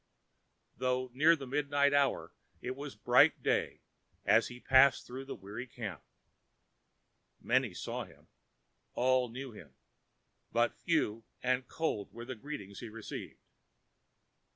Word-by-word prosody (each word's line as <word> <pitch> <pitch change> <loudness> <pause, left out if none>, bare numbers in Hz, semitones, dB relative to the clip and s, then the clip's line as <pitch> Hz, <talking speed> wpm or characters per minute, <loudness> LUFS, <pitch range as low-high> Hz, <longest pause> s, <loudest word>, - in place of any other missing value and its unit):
Though 130 0 0
near 155 +6 +6
the 140 -4 -7
midnight 140 +1 +2
hour, 140 -1 +2 0.3
it 130 +1 -4
was 140 0 -7
bright - - +4
day - - 0 0.4
as - - +5
he 125 - -9
passed 130 +1 +5
through 130 +2 -7
the 135 - -6
weary 105 +5 -7
camp. 110 -9 -6 1.4
Many - - +1
saw - - -4
him, - - -19 0.7
all 130 0 +3
knew 130 +2 -7
him, 75 - -13 0.8
but - - +2
few 110 +2 0 0.2
and 125 0 +1
cold 155 -11 -2
were 120 - -8
the 130 - -5
greetings 110 -6 -7
he 120 - -7
received. 110 0 -7
130 Hz, 130 wpm, -33 LUFS, 115-140 Hz, 1.4 s, near